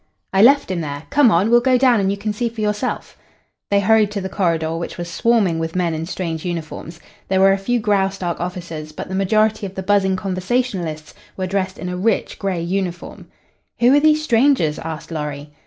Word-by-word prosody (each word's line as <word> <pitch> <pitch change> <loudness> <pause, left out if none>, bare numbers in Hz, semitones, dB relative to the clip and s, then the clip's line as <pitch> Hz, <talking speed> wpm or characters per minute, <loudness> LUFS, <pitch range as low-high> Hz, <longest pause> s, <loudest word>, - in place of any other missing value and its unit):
"I 195 - +4
left 275 -2 +5
him 175 -2 -2
there. 145 -1 -5
Come 285 -4 +5
on! 200 +4 +2
We'll 240 - +7
go 255 0 +3
down 250 -3 +4
and 195 -1 +1
you 200 - -1
can 210 +1 -3
see 235 +3 -1
for 230 0 -11
yourself." 210 +3 -3 0.5
They 200 0 +3
hurried 215 +1 +4
to 205 - -2
the 190 -1 -4
corridor, 165 -4 0
which 170 +1 -5
was 175 -1 -5
swarming 200 -5 +2
with 165 +1 -4
men 175 -2 0
in 160 +1 -4
strange 165 -4 -4
uniforms. 165 -1 -6 0.3
There 190 0 +1
were 195 0 +6
a - - 0
few 240 +5 0
Graustark 195 -4 0
officers, 170 -3 -6
but - - -7
the - - -5
majority 215 +2 +1
of 190 - -12
the 190 - -4
buzzing 190 -1 +2
conversationalists 185 -4 -2 0.2
were 185 - -2
dressed 190 0 -2
in 180 - -6
a 180 0 -3
rich 210 +3 -1
gray 190 -4 -2
uniform. 180 -1 -4 0.5
"Who 245 +2 +5
are 290 - +6
these 310 0 +3
strangers?" 230 - +2
asked 160 0 -7
Lorry. 150 -2 -5
190 Hz, 205 wpm, -20 LUFS, 170-215 Hz, 0.5 s, We'll